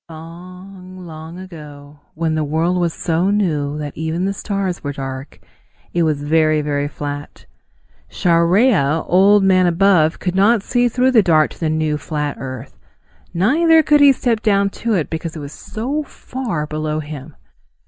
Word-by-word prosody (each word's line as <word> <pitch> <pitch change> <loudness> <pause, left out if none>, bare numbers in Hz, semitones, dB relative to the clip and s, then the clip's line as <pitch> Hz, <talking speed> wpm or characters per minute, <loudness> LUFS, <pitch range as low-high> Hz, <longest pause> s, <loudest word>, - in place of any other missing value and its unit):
Long, 180 +3 -11
long 160 +1 -9
ago, 150 -5 -11 0.2
when 160 0 -1
the 155 -1 0
world 160 +5 0
was 170 -1 +1
so 170 +3 -1
new 155 -8 0
that 150 -2 -6
even 160 +3 -2
the 195 - -1
stars 195 -3 -3
were 145 -1 -3
dark, 135 0 -7 0.5
it 175 - +1
was 155 -3 0
very, 155 0 +2
very 145 -1 -1
flat. 145 0 -7 0.6
Chareya, 170 - +2
Old 195 +3 +4
Man 185 -1 +4
Above, 170 -2 +3
could 180 - -3
not 200 +3 +3
see 245 +1 +1
through 250 +3 +2
the 235 -4 +5
dark 160 -5 +3
to - - -14
the 160 - -1
new, 155 -1 -1
flat 150 -2 -3
earth. 130 0 -8 0.5
Neither 320 - +3
could 295 0 +4
he 285 -1 +8
step 240 -4 0
down 200 -2 +2
to 230 -2 +1
it 165 -5 -2
because 160 0 -4
it - - -6
was 145 0 -8
so 265 +8 -4
far 250 - -5
below 155 0 -3
him. 150 -1 -8
170 Hz, 165 wpm, -18 LUFS, 150-195 Hz, 0.6 s, he